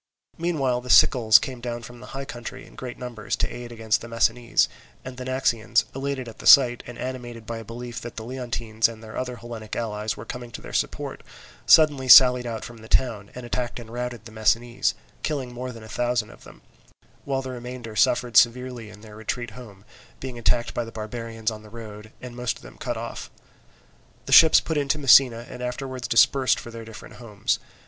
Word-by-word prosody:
Meanwhile 140 Hz, -8 st, 0 dB
the 125 Hz, -, -11 dB
Sicels 110 Hz, -4 st, +7 dB
came 130 Hz, -2 st, -6 dB
down 120 Hz, -1 st, -5 dB
from 120 Hz, +1 st, -11 dB
the 125 Hz, -, -11 dB
high 135 Hz, -, -4 dB
country 120 Hz, -4 st, -8 dB
in -, -, -17 dB
great 125 Hz, -2 st, -7 dB
numbers, 120 Hz, -4 st, -4 dB
to -, -, 0 dB
aid 120 Hz, 0 st, -8 dB
against 110 Hz, -2 st, 0 dB
the 115 Hz, -, -8 dB
Messinese; 115 Hz, +1 st, +2 dB, 0.4 s
and 130 Hz, 0 st, -7 dB
the 125 Hz, 0 st, -7 dB
Naxians, 120 Hz, -3 st, +1 dB
elated 135 Hz, -1 st, -3 dB
at 115 Hz, -, -11 dB
the -, -, -4 dB
sight, 125 Hz, -3 st, +7 dB
and 120 Hz, -, -9 dB
animated 120 Hz, -3 st, -6 dB
by 115 Hz, +1 st, -5 dB
a -, -, -8 dB
belief 120 Hz, +2 st, -7 dB
that 120 Hz, -, -8 dB
the 110 Hz, -, -6 dB
Leontines 120 Hz, -3 st, -1 dB
and 115 Hz, -1 st, -11 dB
their 110 Hz, 0 st, -10 dB
other 125 Hz, -1 st, -3 dB
Hellenic 115 Hz, -2 st, -8 dB
allies 105 Hz, -2 st, -3 dB
were 105 Hz, -, -8 dB
coming 120 Hz, 0 st, -7 dB
to -, -, -6 dB
their -, -, -10 dB
support, -, -, -2 dB, 0.5 s
suddenly 150 Hz, -5 st, +6 dB
sallied 125 Hz, -1 st, +8 dB
out 115 Hz, -2 st, -5 dB
from 120 Hz, -, -10 dB
the 110 Hz, -, -12 dB
town, 110 Hz, -5 st, 0 dB
and 125 Hz, -1 st, -7 dB
attacked 120 Hz, 0 st, -3 dB
and 115 Hz, -1 st, -11 dB
routed 120 Hz, -2 st, -5 dB
the 115 Hz, -, -11 dB
Messinese, 115 Hz, +2 st, +1 dB, 0.3 s
killing 135 Hz, -5 st, -3 dB
more 125 Hz, +1 st, -5 dB
than 115 Hz, -2 st, -11 dB
a -, -, -11 dB
thousand 120 Hz, -1 st, -1 dB
of -, -, -17 dB
them; -, -, -15 dB, 0.6 s
while 135 Hz, -1 st, -2 dB
the 130 Hz, -, -5 dB
remainder 125 Hz, -2 st, -8 dB
suffered 120 Hz, +1 st, +2 dB
severely 120 Hz, -1 st, +3 dB
in 105 Hz, 0 st, -14 dB
their 105 Hz, -1 st, -13 dB
retreat 110 Hz, +2 st, -4 dB
home, 105 Hz, -4 st, -13 dB, 0.3 s
being 130 Hz, -2 st, -6 dB
attacked 120 Hz, 0 st, +1 dB
by 120 Hz, -, -1 dB
the 115 Hz, -, -9 dB
barbarians 115 Hz, 0 st, -4 dB
on 110 Hz, -1 st, -8 dB
the 110 Hz, -, -14 dB
road, 110 Hz, -1 st, -10 dB
and 125 Hz, -1 st, -9 dB
most 125 Hz, -1 st, -2 dB
of -, -, -18 dB
them -, -, -12 dB
cut -, -, -3 dB
off. -, -, -6 dB, 1.0 s
The -, -, -6 dB
ships 160 Hz, -1 st, +9 dB
put 160 Hz, -, -3 dB
in 145 Hz, -1 st, 0 dB
to 150 Hz, +2 st, +1 dB
Messina, 130 Hz, -4 st, +5 dB
and 125 Hz, -, -9 dB
afterwards 125 Hz, +1 st, -4 dB
dispersed 130 Hz, +2 st, +4 dB
for 120 Hz, -, -9 dB
their 115 Hz, -1 st, -8 dB
different 110 Hz, -1 st, -11 dB
homes. 105 Hz, -5 st, -2 dB
120 Hz, 210 wpm, -24 LUFS, 115-125 Hz, 1.0 s, ships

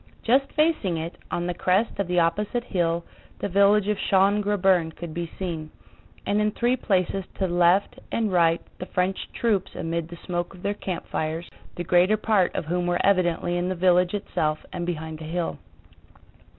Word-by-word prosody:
Just 265 Hz, +4 st, +3 dB
facing 305 Hz, -, +1 dB
it, 165 Hz, +2 st, -5 dB
on 175 Hz, -, -2 dB
the 180 Hz, -, -1 dB
crest 190 Hz, +6 st, +1 dB
of 200 Hz, -, 0 dB
the 180 Hz, 0 st, -1 dB
opposite 205 Hz, +8 st, 0 dB
hill, 170 Hz, -6 st, 0 dB, 0.3 s
the -, -, -2 dB
village 200 Hz, +1 st, +4 dB
of 210 Hz, -1 st, 0 dB
Schön 200 Hz, +2 st, +3 dB
Grabern 190 Hz, -5 st, +2 dB
could 170 Hz, -2 st, -7 dB
be 170 Hz, 0 st, -4 dB
seen, 165 Hz, -5 st, -4 dB, 0.6 s
and 205 Hz, +1 st, +1 dB
in 210 Hz, -, +2 dB
three 240 Hz, +4 st, +1 dB
places 195 Hz, -5 st, 0 dB
to 190 Hz, -, 0 dB
left 175 Hz, +2 st, +3 dB
and 220 Hz, -3 st, 0 dB
right 165 Hz, -1 st, +4 dB, 0.2 s
the 180 Hz, -, -5 dB
French 185 Hz, +1 st, -1 dB
troops 205 Hz, -5 st, 0 dB
amid 165 Hz, 0 st, -2 dB
the 170 Hz, -, -9 dB
smoke 175 Hz, +1 st, -3 dB
of 180 Hz, -, -15 dB
their 200 Hz, -, 0 dB
campfires, 170 Hz, -4 st, -4 dB, 0.3 s
the 175 Hz, -, -3 dB
greater 180 Hz, +5 st, +4 dB
part 210 Hz, -4 st, +2 dB
of -, -, -2 dB
whom 175 Hz, +2 st, -1 dB
were 175 Hz, 0 st, +1 dB
evidently 175 Hz, -2 st, +2 dB
in 175 Hz, +1 st, -1 dB
the 185 Hz, -, -1 dB
village 180 Hz, +1 st, +3 dB
itself 155 Hz, -6 st, -2 dB
and 175 Hz, -1 st, -3 dB
behind 160 Hz, -2 st, -4 dB
the -, -, -8 dB
hill. 165 Hz, -, -3 dB
180 Hz, 180 wpm, -25 LUFS, 170-200 Hz, 0.6 s, village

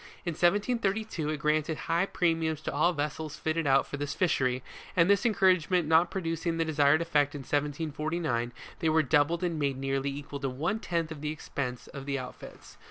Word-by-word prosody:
In 170 Hz, -, -1 dB
173'2, 200 Hz, -1 st, +1 dB
it -, -, -6 dB
granted 155 Hz, +2 st, 0 dB
high 170 Hz, +3 st, +1 dB
premiums 165 Hz, -4 st, 0 dB
to -, -, -4 dB
all 155 Hz, +5 st, +3 dB
vessels 150 Hz, -1 st, -3 dB
fitted 160 Hz, -1 st, -1 dB
out 135 Hz, 0 st, +4 dB
for 145 Hz, -, -6 dB
this 145 Hz, 0 st, -3 dB
fishery, 130 Hz, -8 st, +1 dB, 0.3 s
and 170 Hz, -1 st, +5 dB
this 200 Hz, +4 st, +4 dB
encouragement 185 Hz, -5 st, +3 dB
not 160 Hz, +3 st, +5 dB
producing 165 Hz, -2 st, -2 dB
the 165 Hz, -, +1 dB
desired 150 Hz, 0 st, +3 dB
effect 145 Hz, -3 st, +1 dB
in 145 Hz, -, -5 dB
1 -, -, -13 dB
749, 150 Hz, -3 st, -1 dB, 0.3 s
they 160 Hz, -, +1 dB
were 160 Hz, 0 st, +4 dB
doubled 150 Hz, +5 st, +2 dB
and 170 Hz, -3 st, -1 dB
made 140 Hz, -2 st, 0 dB
nearly 135 Hz, +1 st, -1 dB
equal 140 Hz, 0 st, -6 dB
to 135 Hz, -1 st, -2 dB
one 160 Hz, +12 st, -1 dB
tenth 165 Hz, -5 st, -2 dB
of 150 Hz, -3 st, -7 dB
the 150 Hz, -, -2 dB
expense 130 Hz, -5 st, -4 dB
of 140 Hz, 0 st, -9 dB
the 140 Hz, -1 st, 0 dB
outfits. 130 Hz, -2 st, -10 dB
155 Hz, 190 wpm, -29 LUFS, 145-170 Hz, 0.3 s, and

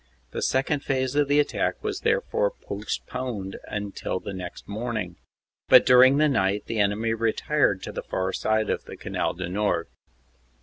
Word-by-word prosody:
The -, -, -4 dB
second 135 Hz, +2 st, +1 dB
phase 130 Hz, -1 st, 0 dB
of 145 Hz, -1 st, +2 dB
the 145 Hz, +1 st, +3 dB
attack 145 Hz, -, 0 dB
was 415 Hz, -3 st, -2 dB
therefore 480 Hz, +1 st, +1 dB
postponed 120 Hz, -7 st, -4 dB
until 100 Hz, -2 st, -3 dB
the 100 Hz, -, -7 dB
next 90 Hz, -2 st, -8 dB
morning, 110 Hz, -4 st, -4 dB, 0.5 s
but -, -, +8 dB
during 130 Hz, +2 st, +7 dB
the 155 Hz, +1 st, +4 dB
night 100 Hz, -7 st, +1 dB
the 115 Hz, -, -3 dB
enemy 105 Hz, +3 st, +1 dB
retired 115 Hz, 0 st, +1 dB
to -, -, -5 dB
the -, -, -5 dB
far 95 Hz, 0 st, -2 dB
side 110 Hz, 0 st, +1 dB
of -, -, -3 dB
the -, -, -9 dB
Canal -, -, -2 dB
du 90 Hz, 0 st, -4 dB
Nord. 95 Hz, -2 st, -1 dB
115 Hz, 165 wpm, -25 LUFS, 100-135 Hz, 0.5 s, but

